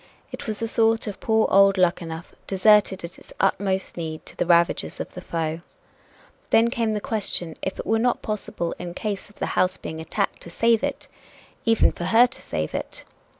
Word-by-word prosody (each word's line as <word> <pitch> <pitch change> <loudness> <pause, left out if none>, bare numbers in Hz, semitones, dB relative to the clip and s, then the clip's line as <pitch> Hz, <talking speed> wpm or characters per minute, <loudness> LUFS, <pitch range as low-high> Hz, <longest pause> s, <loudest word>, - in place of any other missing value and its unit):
It - - -7
was 215 -1 -2
the 225 - -2
thought 225 0 +2
of 205 -3 -6
poor 220 -1 +2
old 195 0 +6
Luckenough 170 -2 -1
"deserted 195 -1 +4
at 170 +1 -8
its - - -17
utmost 195 -1 0
need" 160 -2 -5
to - - -11
the 175 - -1
ravages 170 -1 +2
of - - -6
the 180 - -7
foe. 165 -2 -3 0.9
Then 230 +1 +4
came 230 -3 0
the 210 - -1
question 200 -6 -2
if 190 - -3
it - - -5
were 225 0 +2
not 245 +1 +1
possible, 205 -5 -3
in 175 -1 -6
case 210 -2 -4
of 205 - -20
the - - -3
house 185 0 +2
being 160 - -6
attacked, 160 - -2
to - - -9
save 230 +5 +2
it - - -3 0.6
even 225 -1 +4
for 175 - -6
her 225 +6 +6
to 260 +2 -6
save 80 0 -3
it. - - -5
195 Hz, 195 wpm, -24 LUFS, 170-220 Hz, 0.9 s, old